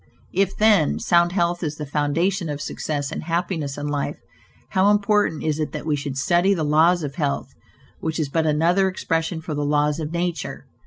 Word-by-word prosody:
If, 195 +1 +1
then, 210 -8 +4
sound 175 0 +3
health 175 -1 0
is 155 -3 -2
the 150 - -5
foundation 160 +6 0
of 145 -1 -3
success 145 -1 -3
and - - -4
happiness 165 -4 -2
in 145 - -4
life, 145 -1 -2 0.5
how 190 +2 +3
important 205 -5 +2
it - - -2
is 155 0 -1
that - - -5
we 155 -2 +1
should 140 -2 -4
study 175 +7 +3
the 160 - -1
laws 160 +3 +3
of 140 -2 -4
health, 145 -4 -2 0.5
which 160 0 -3
is 155 - 0
but 160 +3 0
another 170 +6 +3
expression 165 -3 -2
for 160 -1 -5
the 145 0 -1
laws 150 +1 +1
of 155 -1 -4
nature! 170 -3 -3
160 Hz, 195 wpm, -23 LUFS, 150-175 Hz, 0.5 s, then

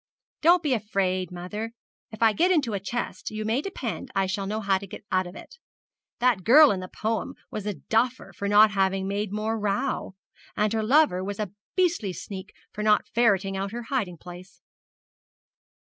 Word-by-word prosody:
'Don't 345 +2 +5
be 290 -4 +2
afraid, 190 -5 -1
mother. 210 +6 -5 0.4
If 220 +1 -3
I 220 -1 +5
get 345 - +3
into 290 - +2
a 200 - -1
chest, 235 +5 -4
you 215 0 -5
may 225 +5 +1
depend 275 - -5
I 195 0 +2
shall 195 +1 -2
know 215 +2 -2
how 195 -3 +1
to 200 - -9
get 195 - -10
out 185 -1 +1
of 175 - -11
it. 485 - -12 0.6
That 240 -6 +2
girl 290 - +8
in 195 - -1
the 185 - -6
poem 225 +8 -3 0.2
was 210 -1 -5
a 205 - -2
duffer 235 +6 -1
for 200 - -4
not 210 +1 +6
having 195 -1 +1
made 200 0 -2
more 215 +2 -2
row; 210 0 -1 0.4
and 210 +1 +1
her 220 - +1
lover 225 -5 +3
was 200 +1 -5
a 210 -4 -3 0.2
beastly 340 - +1
sneak 190 +1 -8 0.2
for 210 - -6
not 210 0 +3
ferreting 200 -5 +2
out 195 +2 -3
her 240 0 -4
hiding 195 -10 -1
place.' 180 +3 -12
210 Hz, 190 wpm, -26 LUFS, 195-235 Hz, 0.6 s, girl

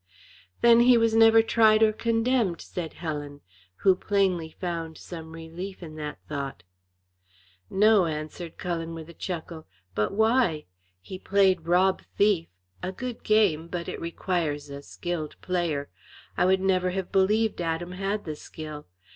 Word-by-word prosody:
"Then 235 0 +7
he 245 0 +6
was 230 -1 +2
never 225 0 +7
tried 220 -1 +4
or 215 -1 +4
condemned," 230 -4 +1
said 170 -3 -6
Helen, 145 -3 -5 0.4
who 190 -1 +7
plainly 185 -5 0
found 165 -2 -5
some 160 -2 -9
relief 170 +4 -8
in 155 -2 -8
that 150 -1 -5
thought. 140 -10 -5 1.1
"No!" 205 -2 +4
answered 155 +2 -6
Cullen, 165 -2 -3
with 160 0 -9
a - - -11
chuckle. 165 -2 -6 0.3
"But 105 +2 0
why? 220 -7 +2 0.4
He 185 - -8
played 190 -4 +2
rob 185 +2 +3 0.2
thief 200 -5 +3 0.3
a 185 - -3
good 240 +4 -6
game, 200 -7 +2
but 170 0 -5
it - - -5
requires 165 -4 -2
a 140 0 -7
skilled 165 0 -5
player. 170 -6 -1 0.5
I - - +2
would 190 +1 +3
never 185 -1 +2
have 185 0 -4
believed 210 +2 +2
Adam 170 +1 -2
had 195 +3 -3
the 155 -2 -4
skill. 150 -1 -9
180 Hz, 145 wpm, -26 LUFS, 160-205 Hz, 1.1 s, Then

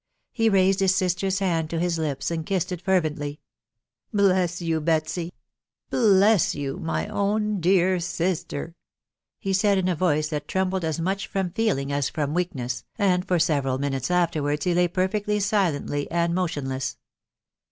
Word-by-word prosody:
He 225 -1 +2
raised 195 -1 +3
his 190 -1 +3
sister's 190 0 0
hand 170 -5 0
to 165 - -2
his 170 -1 0
lips, 150 0 -2
and 165 -1 -2
kissed 185 +1 -1
it 180 -2 -4
fervently. 155 -6 0 0.4
" - - -58
Bless 185 -4 +2
you, 165 -2 -1
Betsy!.... 165 +2 -1 0.6
bless 205 -4 +4
you, 140 -2 -4
my 160 - -2
own 210 0 0
dear 185 +1 +3
sister 170 -3 -2
f".... - - -21 0.6
he 195 - -2
said 200 +1 +3
in 185 -1 +1
a 180 - +1
voice 155 -3 +1
that 150 -2 -4
trembled 190 -1 -1
as 160 0 -1
much 190 +4 -1
from 190 -3 -2
feeling 170 -11 0
as 140 -1 0
from 150 -1 -2
weakness, 130 -9 -2
and 185 -3 +1
for 180 - +2
•several 140 -5 +1
minutes 135 -1 -2
afterwards 155 -4 0
he 180 - +2
lay 175 +1 +3
perfectly 205 +4 0
silently 175 -8 0
and 170 0 0
mo 185 +1 +1
tionless. 135 -4 -3
175 Hz, 165 wpm, -25 LUFS, 155-190 Hz, 0.6 s, bless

